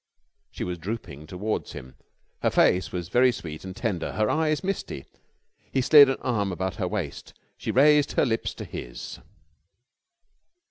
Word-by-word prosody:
She -, -, -6 dB
was 90 Hz, -1 st, -4 dB
drooping 85 Hz, -7 st, -6 dB
towards 100 Hz, +6 st, -3 dB
him. 65 Hz, 0 st, -9 dB, 0.5 s
Her -, -, +3 dB
face 90 Hz, -3 st, +3 dB
was 90 Hz, -2 st, -4 dB
very 125 Hz, +4 st, +5 dB
sweet 80 Hz, -9 st, -7 dB
and 95 Hz, -1 st, -7 dB
tender, 100 Hz, -7 st, -2 dB
her 105 Hz, +1 st, +1 dB
eyes 155 Hz, 0 st, +1 dB
misty. 185 Hz, -, -3 dB, 0.7 s
He 130 Hz, -, +1 dB
slid 140 Hz, +1 st, +8 dB
an 135 Hz, -, 0 dB
arm 105 Hz, -6 st, 0 dB
about 95 Hz, +1 st, -3 dB
her 95 Hz, -5 st, -1 dB
waist. 90 Hz, -7 st, -5 dB, 0.2 s
She -, -, -6 dB
raised 145 Hz, +2 st, +5 dB
her -, -, +3 dB
lips 115 Hz, -3 st, -1 dB
to -, -, -7 dB
his. -, -, -7 dB
100 Hz, 155 wpm, -26 LUFS, 90-130 Hz, 0.7 s, slid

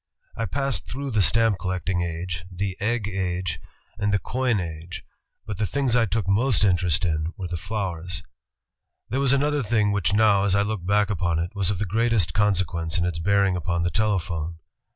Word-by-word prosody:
I 115 Hz, -, -2 dB
passed 135 Hz, +3 st, -2 dB
through 140 Hz, +2 st, -4 dB
the 110 Hz, -3 st, +3 dB
stamp 110 Hz, 0 st, +3 dB
collecting 90 Hz, -1 st, -1 dB
age, 85 Hz, -1 st, -4 dB
the 95 Hz, +1 st, -3 dB
egg 110 Hz, 0 st, 0 dB
age, 95 Hz, -2 st, -2 dB, 0.4 s
and 105 Hz, 0 st, +1 dB
the 100 Hz, -, +3 dB
coin 125 Hz, 0 st, 0 dB
age, 85 Hz, 0 st, -6 dB, 0.4 s
but 105 Hz, -2 st, -5 dB
the 105 Hz, -, +1 dB
things 135 Hz, -1 st, +1 dB
I 115 Hz, -2 st, +3 dB
took 100 Hz, 0 st, -1 dB
most 110 Hz, +3 st, +3 dB
interest 90 Hz, -2 st, +2 dB
in 80 Hz, 0 st, -1 dB
were 95 Hz, -3 st, -4 dB
the 85 Hz, -, -4 dB
flowers. 90 Hz, -2 st, -4 dB, 0.4 s
*' -, -, -57 dB
There 130 Hz, -, -1 dB
was 140 Hz, -2 st, +3 dB
another 145 Hz, +1 st, +2 dB
thing 110 Hz, -3 st, +2 dB
which 100 Hz, -1 st, +1 dB
now, 105 Hz, -2 st, +4 dB
as 100 Hz, -1 st, +2 dB
I 100 Hz, -, +3 dB
look 105 Hz, -3 st, -3 dB
back 105 Hz, +1 st, +3 dB
upon 85 Hz, -4 st, 0 dB
it, 85 Hz, +2 st, -2 dB
was 100 Hz, -3 st, 0 dB
of 100 Hz, -, 0 dB
the 105 Hz, -, -1 dB
greatest 110 Hz, -4 st, +1 dB
consequence 90 Hz, -4 st, +1 dB
in 85 Hz, -, +1 dB
its 85 Hz, -2 st, -2 dB
bearing 100 Hz, +1 st, +2 dB
upon 85 Hz, 0 st, -1 dB
the 85 Hz, -, 0 dB
telephone. 85 Hz, -6 st, -1 dB
100 Hz, 195 wpm, -24 LUFS, 90-110 Hz, 0.4 s, now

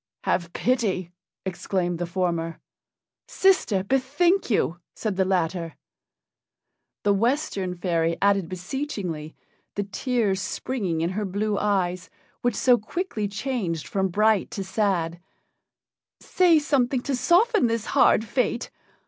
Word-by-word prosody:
"Have 170 Hz, -2 st, 0 dB
pity!" 200 Hz, -8 st, 0 dB, 0.3 s
exclaimed 175 Hz, -1 st, -2 dB
the 175 Hz, -, -2 dB
former. 170 Hz, -2 st, -2 dB, 0.7 s
"Sister, 365 Hz, -, +2 dB
bethink 280 Hz, -, +1 dB
you," 175 Hz, -6 st, +1 dB, 0.2 s
said 215 Hz, -4 st, -2 dB
the 190 Hz, 0 st, +2 dB
latter; 175 Hz, -2 st, -1 dB, 1.3 s
the 205 Hz, -, +4 dB
Western 200 Hz, -5 st, 0 dB
fairy 170 Hz, -2 st, 0 dB
adding 200 Hz, -3 st, +2 dB
beseechingly, 180 Hz, -, -4 dB, 0.4 s
the 205 Hz, -, 0 dB
tears 205 Hz, -1 st, -1 dB
springing 190 Hz, -4 st, -2 dB
in 170 Hz, +2 st, 0 dB
her 210 Hz, +3 st, -2 dB
blue 205 Hz, +2 st, -1 dB
eyes, 185 Hz, -4 st, 0 dB, 0.3 s
which 245 Hz, -3 st, +1 dB
so 250 Hz, -2 st, +4 dB
quickly 220 Hz, -, -3 dB
changed 200 Hz, -, -3 dB
from 190 Hz, -1 st, 0 dB
bright 210 Hz, +2 st, +2 dB
to 195 Hz, -, -4 dB
sad, 185 Hz, -4 st, 0 dB, 1.0 s
"Say 355 Hz, -3 st, +4 dB
something 270 Hz, -4 st, +1 dB
to 275 Hz, +1 st, -1 dB
soften 360 Hz, -, +3 dB
this 230 Hz, -1 st, -1 dB
hard 220 Hz, -, +4 dB
fate. 240 Hz, +1 st, -1 dB
200 Hz, 120 wpm, -25 LUFS, 180-245 Hz, 1.3 s, the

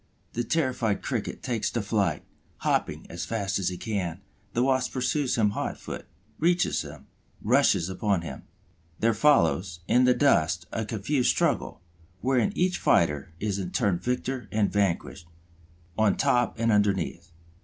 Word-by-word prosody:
The 120 Hz, -, -1 dB
terrified 125 Hz, -7 st, 0 dB
Cricket -, -, -3 dB
takes 115 Hz, -3 st, -1 dB
to 120 Hz, -, -2 dB
flight, 100 Hz, -7 st, 0 dB, 0.4 s
hopping -, -, 0 dB
as -, -, -6 dB
fast 100 Hz, -4 st, -2 dB
as 95 Hz, -, 0 dB
he 90 Hz, -, -5 dB
can; 95 Hz, -4 st, -3 dB, 0.3 s
the 120 Hz, -, +2 dB
Wasp 130 Hz, -1 st, +1 dB
pursues 130 Hz, +1 st, 0 dB
him 105 Hz, -2 st, +3 dB
hot -, -, -3 dB
foot, -, -, -8 dB, 0.3 s
reaches 175 Hz, +2 st, +2 dB
him, -, -, -10 dB, 0.4 s
rushes 105 Hz, -7 st, +3 dB
upon 95 Hz, -1 st, 0 dB
him. 85 Hz, -, -7 dB, 0.6 s
There 115 Hz, +1 st, +2 dB
follows, 95 Hz, -, +2 dB
in 125 Hz, +1 st, +4 dB
the 125 Hz, 0 st, +4 dB
dust, 85 Hz, -, +2 dB
a 110 Hz, -, -2 dB
confused 120 Hz, +5 st, 0 dB
struggle, -, -, 0 dB, 0.4 s
wherein 130 Hz, -, +1 dB
each 180 Hz, 0 st, +1 dB
fighter 80 Hz, 0 st, +2 dB
is 100 Hz, -2 st, -1 dB
in 90 Hz, -2 st, -3 dB
turn 100 Hz, -8 st, +1 dB
victor 125 Hz, +4 st, -2 dB
and 105 Hz, -2 st, +1 dB
vanquished, 95 Hz, -4 st, -1 dB, 0.7 s
on 110 Hz, -3 st, +3 dB
top 125 Hz, -3 st, +2 dB
and 115 Hz, 0 st, +2 dB
underneath. 95 Hz, -4 st, 0 dB
110 Hz, 150 wpm, -27 LUFS, 95-125 Hz, 0.7 s, in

